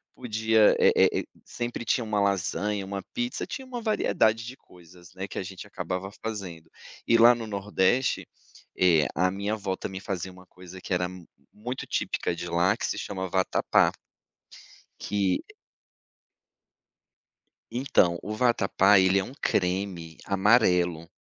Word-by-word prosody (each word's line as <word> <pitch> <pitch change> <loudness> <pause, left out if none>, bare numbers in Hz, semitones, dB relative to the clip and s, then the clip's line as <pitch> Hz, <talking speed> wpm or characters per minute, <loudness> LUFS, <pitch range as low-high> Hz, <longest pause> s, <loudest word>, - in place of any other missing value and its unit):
podia, 110 -2 +3
eh - - +6 0.2
eh, - - -1 0.2
sempre 120 0 -5
tinha 120 - +1
uma 110 -2 -1
lasanha, 100 +1 0
uma 100 0 -5
pizza, 245 0 -2
tinha 265 - -6
uma 245 -2 -5
variedade 115 - +1
de 130 +3 -8
coisas, 90 0 -18
né, 95 +1 -5
que - - -9
a - - -3
gente 95 +1 -9
acabava 95 0 -5
fazendo. 95 -7 -6 0.4
E 115 - +5
lá 120 +1 +8
no 115 -1 -6
nordeste, 105 +4 0 0.5
eh, 85 -5 +4
a 90 +3 +2
minha 100 +2 -2
avó 100 -3 -2
também 95 0 -6
fazia 95 -2 -4
uma 90 0 -16
coisa 90 0 -12
que 95 - -4
era 90 0 +1 0.5
muito 120 +5 -6
típica - - -1
de 85 +1 -6
lá 85 +5 +2
que - - -3
se - - -2
chama 95 -2 -4
vatapá. 95 +1 +2 1.1
Que 100 -3 0 2.3
Então, 115 -9 +2
o 105 - -5
vatapá, 105 -4 +4
ele 95 +1 +4
é - - -1
um 125 - -9
creme 90 -3 -1
amarelo. 90 -5 +2
100 Hz, 145 wpm, -27 LUFS, 90-110 Hz, 2.3 s, lá